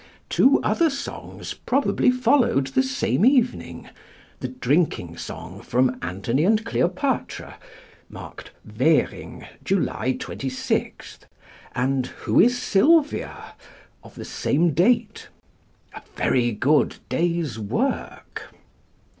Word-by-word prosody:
Two 270 +2 +4
other 335 -2 +2
songs 275 -1 -7
probably 270 0 +1
followed 250 - +2
the 200 - +2
same 265 -6 0
evening: 255 -1 +1 0.5
the - - -3
drinking 150 - 0
song - - -8
from 125 +1 0
Antony 100 - -1
and 215 +4 +2
Cleopatra, 185 +10 -2 0.5
marked - - -10 0.2
"Währing, - - 0 0.2
July 180 -8 0
26," 130 -1 -4 0.6
and 130 +1 0 0.2
Who - - +3
is 245 +2 +5
Sylvia? 290 +8 +1 0.5
of - - -15
the - - -8
same 160 +3 0
date 220 - +1 0.7
a - - -9 0.2
very 120 -2 +2
good 135 +8 +2
day's 165 -8 -1
work. 125 - -4
175 Hz, 100 wpm, -23 LUFS, -, 0.7 s, is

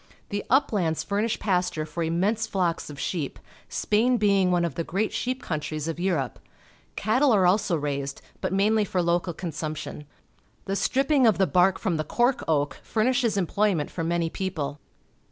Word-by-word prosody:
The 205 0 -2
uplands 200 - +2
fur 200 +5 -1
nish 230 0 0
pasture 180 -6 0
for 165 +2 -5
immense 190 +7 0
flocks 175 -5 -1
of 145 -2 -9
sheep, 155 -2 -3 0.3
Spain 240 +4 +2
being 200 -3 +3
one 175 -1 +2
of 165 - -3
the 165 - -2
great 195 +6 -1
sheep 255 +1 -2
countries 155 -1 -3
of 165 +1 -3
Europe. 165 - -1 0.6
Cattle 255 +7 +2
are 195 -4 +4
also 195 0 +3
raised, 140 -2 -3 0.2
bu - - 0
fc - - -11
mainly 210 +3 +3
for 190 -2 -2
local 175 +1 +1
consumption. 155 -3 -5 0.6
The 195 - -1
strip 270 +7 +1
ping 275 -5 +5
of 215 -6 +4
the 190 - +4
bark 185 +1 +3
from 185 -7 -1
the 155 - -1
cork 245 - +1
oak 145 -3 0
furnishes 235 0 +1
employment 195 -3 +1
for 165 - -3
many 170 0 0
people. 155 -7 -3
185 Hz, 175 wpm, -26 LUFS, 160-215 Hz, 0.6 s, ping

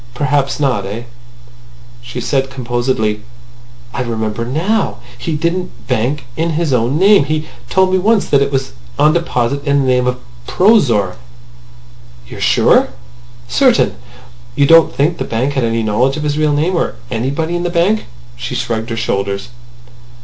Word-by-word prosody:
Perhaps 145 -1 0
not. 130 -8 +1
Eh?" 110 +4 -5 1.0
She 120 +1 -7
said 135 +2 0
composedly: 120 -4 -1 0.7
"I 135 - -2
remember 110 -2 -3
now! 175 - -1 0.2
He 155 +6 -3
didn't 170 -4 -3
bank 130 +3 -1
in 165 +1 -1
his 155 -3 0
own 125 +4 +1
name. 195 -3 +5
He 155 +1 -2 0.2
told 190 0 +3
me 185 - +3
once 215 +2 +2
that 140 - +3
it 140 0 +1
was 135 -1 -1 0.3
on 155 +1 +4
deposit 140 -5 -1
in 140 -1 +2
the - - 0
name 125 -1 +2
of 125 0 0 0.3
Prozor." 125 - +3 1.1
"You - - -10
are - - -9
sure?" - - +4 0.6
"Certain." - - +3 0.6
"You 140 - +3
don't 165 +2 +6
think 155 +5 0
the - - 0
bank 125 +5 -1
had 135 -3 0
any 115 0 0
knowledge 120 +7 +1
of 155 - -4
his 145 -1 -1
real 155 -1 +1
name? 160 +6 +1
Or 170 - -1 0.2
anybody 140 +8 -2
in 175 - -1
the 175 - -1
bank 175 +5 +2
or—" - - -15 0.3
She - - -5
shrugged 115 0 -2
her 115 - -3
shoulders. 100 -1 -2
140 Hz, 165 wpm, -16 LUFS, 120-165 Hz, 1.1 s, don't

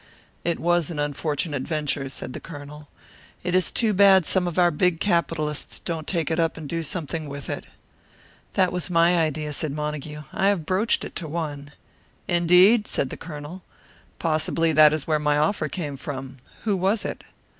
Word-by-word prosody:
"It 170 -1 0
was 175 -2 +2
an 165 - -5
unfortunate 145 0 -2
venture," 145 -2 -2
said 130 - -6
the - - -5
Colonel. 150 -1 -10 0.6
"It 180 0 -2
is 185 -2 +3
too 225 -3 +2
bad 190 -2 +6
some 180 +1 +2
of 175 - -4
our 175 -1 +5
big 170 +2 +2
capitalists 165 -5 -1
don't 160 -2 -4
take 170 -3 -1
it 160 - 0
up 165 -1 +1
and 155 -2 -7
do 165 +3 -2
something 160 -1 -3
with 140 -1 -6
it." - - -5 0.9
"That 185 -2 +3
was 180 0 -2
my 170 0 +4
idea," 155 -1 -1
said 145 0 -2
Montague. 150 0 -4
"I 195 - +1
have 195 -6 +1
broached 190 +7 +1
it - - -9
to 165 - -4
one." 145 -3 -5 0.5
"Indeed?" 180 +6 +5
said 130 - -1
the - - -4
Colonel. 155 +2 -8 0.6
"Possibly 165 0 +1
that 155 0 +7
is 155 -2 -2
where 155 -1 +1
my 150 0 +2
offer 155 0 +1
came 145 -5 -4
from. 135 -1 -7 0.2
Who 210 -3 +1
was 195 +4 +1
it?" - - -5
160 Hz, 180 wpm, -24 LUFS, 150-175 Hz, 0.9 s, that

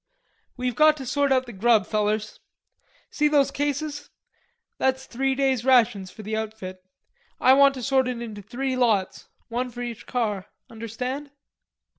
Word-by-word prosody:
"We've 250 0 -1
got 305 0 +5
to 265 - -7
sort 285 +2 +1
out 260 -1 +3
the 240 - -10
grub, 215 0 +3
fellers. 215 +1 -1 0.7
See 300 - +2
those 285 -2 +3
cases? 290 +1 -3 0.7
That's 265 0 +1
three 265 +2 -1
days' 265 -3 +1
rations 225 -7 +3
for 215 - -11
the 215 +2 -3
outfit. 210 -4 -6 0.6
I 260 - +6
want 275 0 +6
to 255 - -6
sort 265 0 +2
it 250 -2 -3
into 220 -3 -7
three 260 +6 -3
lots, 220 -7 0 0.2
one 245 +2 -2
for 245 0 -7
each 235 -2 -7
car. 210 -6 -2 0.2
Understand?" 250 +6 -5
250 Hz, 155 wpm, -25 LUFS, 220-270 Hz, 0.7 s, I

